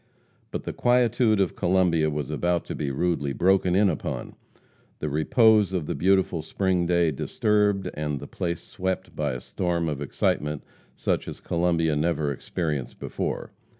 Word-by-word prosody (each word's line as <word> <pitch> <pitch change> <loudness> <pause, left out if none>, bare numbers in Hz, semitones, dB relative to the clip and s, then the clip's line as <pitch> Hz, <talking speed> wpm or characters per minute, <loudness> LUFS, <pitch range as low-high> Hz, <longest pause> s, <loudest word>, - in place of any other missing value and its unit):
But - - -4
the - - -4
quietude 120 -3 +3
of 95 -3 +1
Columbia 90 -4 +2
was 75 -1 -3
about 85 +3 0
to - - -5
be 70 - -2
rudely 70 -1 0
broken 95 +1 +3
in 100 +1 +5
upon, 80 -6 -3 0.6
the 75 - -3
repose 105 - +4
of 90 -5 -1
the - - -2
beautiful 95 -2 +2
spring 90 +2 0
day 85 -2 +3
disturbed, 105 +6 +1
and 75 -2 -3
the - - -8
place 85 -1 -3
swept 95 0 -4
by 75 -3 -1
a 60 - -4
storm 85 +5 -2
of 75 -2 -3
excitement 75 +1 -1 0.3
such - - -1
as - - -7
Columbia 85 -2 +1
never 75 -1 0
experienced 75 -1 -3
before. - - -4
85 Hz, 155 wpm, -25 LUFS, 75-95 Hz, 0.6 s, in